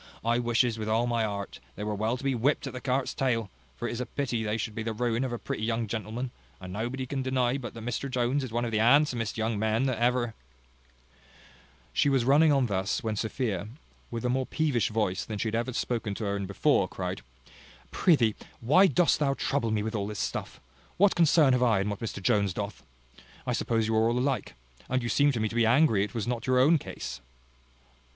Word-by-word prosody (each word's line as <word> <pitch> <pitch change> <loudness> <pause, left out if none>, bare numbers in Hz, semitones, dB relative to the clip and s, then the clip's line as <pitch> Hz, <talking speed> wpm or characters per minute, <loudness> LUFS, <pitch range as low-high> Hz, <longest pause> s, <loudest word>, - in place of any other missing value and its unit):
I 120 +1 +2
wishes, 120 -1 +1
with 110 0 -3
all 115 +2 +2
my 120 -1 0
heart, 100 -2 -4 0.2
they 105 - -5
were 105 0 -2
well 110 +4 -1
to 125 - -11
be 135 -1 +1
whipped 130 +5 +1
at - - -5
the 125 - -6
cart's 130 0 -1
tail; 115 -6 -1 0.2
for 120 - -4
it - - -3
is 120 - -3
pity 125 -5 -1
they 105 0 -1
should 110 0 -3
be 110 - -4
the 110 0 -2
ruin 120 +2 0
of 130 - -2
a 120 - -2
pretty 105 - -5
young 115 0 0
gentleman; 110 +3 -4 0.3
and 95 -1 -8
nobody 120 +5 -3
can 135 +1 -3
deny 130 -1 +1
but 120 -3 -7
that 115 -1 -8
Mr 120 +3 -3
Jones 130 +2 0
is 130 - -5
one 120 +1 -1
of 115 - -3
the 110 - +1
most 110 - +3
handsomest 125 -4 +3
young 110 -1 -1
men 110 +3 +1
that 130 -4 0
ever 120 -1 +1 0.8
" 60 0 -27
She 145 - +3
was 135 -4 +2
running 150 +4 +5
on 135 -3 +3
thus, 95 -3 -1
when 110 -1 -1
Sophia, 110 -3 -2 0.4
with 115 0 -4
a - - +2
more 130 +1 0
peevish 150 -7 +1
voice 105 -4 -1
than 110 - -5
she 110 - -1
had - - -7
ever 115 +2 -1
spoken 115 -4 -2
to 110 - -5
her 100 -1 -1
in 100 -1 -3
before, 100 - +2
cried, - - -5 0.7
"Prithee, 125 - +3 0.3
why 165 +12 +5
dost 175 +1 +3
thou 140 -2 +1
trouble 135 -5 -1
me 110 -1 0
with 110 +1 -3
all 100 -2 -2
this 105 0 -6
stuff? - - -4 0.4
What 200 +2 +5
concern 155 -4 +5
have 125 - +2
I 115 -5 +3
in 100 +2 -1
what 100 - -5
Mr 105 -4 -5
Jones 100 -5 +2
doth? 100 -2 -5 0.6
I - - 0
suppose 115 -2 0
you 110 - 0
are 110 +1 +3
all 120 - 0
alike. 135 +1 -1 0.3
And 130 -1 0
you 120 - -2
seem 145 +3 +4
to 120 - -2
me 110 - +1
to 110 - -7
be 115 -1 +3
angry 120 -5 +4
it 105 +2 -6
was 115 - -1
not 120 0 -3
your 130 0 +3
own 150 +5 +5
case." - - -7
120 Hz, 235 wpm, -28 LUFS, 110-130 Hz, 0.8 s, running